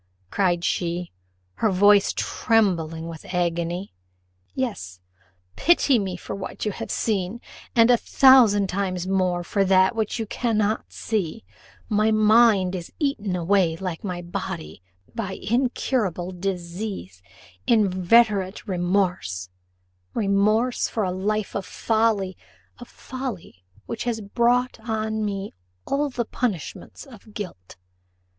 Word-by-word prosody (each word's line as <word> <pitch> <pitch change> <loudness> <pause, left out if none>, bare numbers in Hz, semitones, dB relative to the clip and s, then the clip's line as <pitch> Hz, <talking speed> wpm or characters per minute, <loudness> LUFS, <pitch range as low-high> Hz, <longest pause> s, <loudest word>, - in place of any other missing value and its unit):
cried 175 -3 +1
she, 175 0 -1 0.5
her 220 - +2
voice 205 +1 +5
trembling 170 -8 +1
with 165 -2 -8
agony. 175 +2 -1 0.6
"Yes, 145 - -4 0.6
pity 285 -5 +4
me 190 -3 -3
for - - -7
what 195 +2 -6
you 210 - 0
have - - -7
seen, 205 0 -1 0.4
and 230 0 +6
a 245 - +6
thousand 235 -7 +6
times 185 -1 -2
more 185 -2 0
for 200 +3 0
that 190 +3 +4
which 220 -2 -1
you 225 - -2
cannot 215 -1 -1
see: 215 -1 -3 0.4
my 215 0 +2
mind 215 -3 +4
is 175 -2 -6
eaten 220 - -1
away 180 -1 +2
like 180 -2 -5
my 180 -3 -4
body 80 - -6 0.3
by 205 -5 -4
incurable 220 -6 -1
disease 180 - -5 0.5
inveterate 205 0 +3
remorse 175 - -1 0.7
remorse 215 +4 +2
for 220 - -1
a 185 - 0
life 205 +3 -2
of 200 - -1
folly 215 -2 0 0.4
of 245 - -10
folly 245 - -7 0.2
which 230 - -5
has 235 -2 -1
brought 240 +4 +1
on 220 -1 -2
me 200 -1 -3 0.3
all 285 +1 0
the 245 -3 -2
punishments 215 - -4
of 220 -5 -15
guilt." 175 - -7
200 Hz, 120 wpm, -24 LUFS, 180-225 Hz, 0.7 s, and